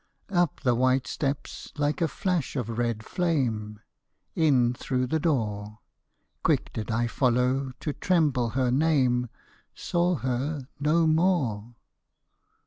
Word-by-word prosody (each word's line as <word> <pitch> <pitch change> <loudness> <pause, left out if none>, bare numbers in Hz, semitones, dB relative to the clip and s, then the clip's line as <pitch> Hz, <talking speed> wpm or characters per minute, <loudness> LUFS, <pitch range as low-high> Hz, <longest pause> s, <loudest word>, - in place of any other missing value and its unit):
Up 175 -4 +1
the 125 -4 +3
white 130 +1 +2
steps 140 +3 -4
like 145 +3 0
a 165 - +3
flash 175 -1 -2
of 115 -3 -3
red 115 -2 -1
flame, 120 - -1 0.5
In 130 -7 +3
through 130 +1 -1
the 160 +6 0
door; 105 -9 -1 0.6
Quick - - +1
did 110 - -4
I 115 +1 +1
follow 125 +2 +1
to 150 - -2
tremble 150 -11 +1
her 130 -2 +2
name 130 -4 +2 0.2
— - - -34
Saw 175 +1 0
her 130 +1 -2
no 155 +3 +3
more. 155 - +1
130 Hz, 130 wpm, -27 LUFS, 120-155 Hz, 0.6 s, the